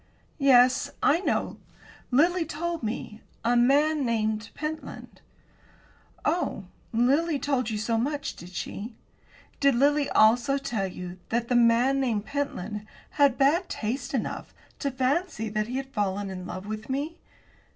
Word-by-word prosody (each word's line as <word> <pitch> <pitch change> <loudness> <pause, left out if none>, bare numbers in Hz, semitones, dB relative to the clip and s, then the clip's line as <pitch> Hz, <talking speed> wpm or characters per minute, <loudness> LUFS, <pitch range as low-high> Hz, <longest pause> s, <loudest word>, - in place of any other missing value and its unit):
"Yes, 260 0 +5
I 305 +4 +4
know; 390 - -1 0.5
Lily 335 +7 +3
told 330 +2 -3
me 220 -1 -5 0.2
a 240 +1 +3
man 285 +5 +4
named 220 -2 -1
Pentland." 305 +1 -6 1.0
"Oh, 300 - 0 0.3
Lily 280 +7 +2
told 265 -3 0
you 215 - -2
so 225 +2 0
much, 285 +3 -2
did 175 - -11
she? 205 +5 -6 0.6
Did 280 -2 +4
Lily 285 +3 +3
also 240 +5 +4
tell 230 -8 -2
you 180 0 -8
that 235 +1 -1
the 250 - +2
man 240 +3 +4
named 225 -6 0
Pentland 215 -8 -3 0.3
had 285 -4 +3
bad 305 +7 +3
taste 245 +4 -3
enough 240 - -4 0.2
to 280 - -1
fancy 265 -2 -1
that 215 0 -1
he 250 +2 -3
had 270 0 -6
fallen 200 -2 -1
in 185 -1 -6
love 185 +1 -6
with 215 +2 -6
me?" 290 +5 -3
250 Hz, 140 wpm, -27 LUFS, 220-285 Hz, 1.0 s, Yes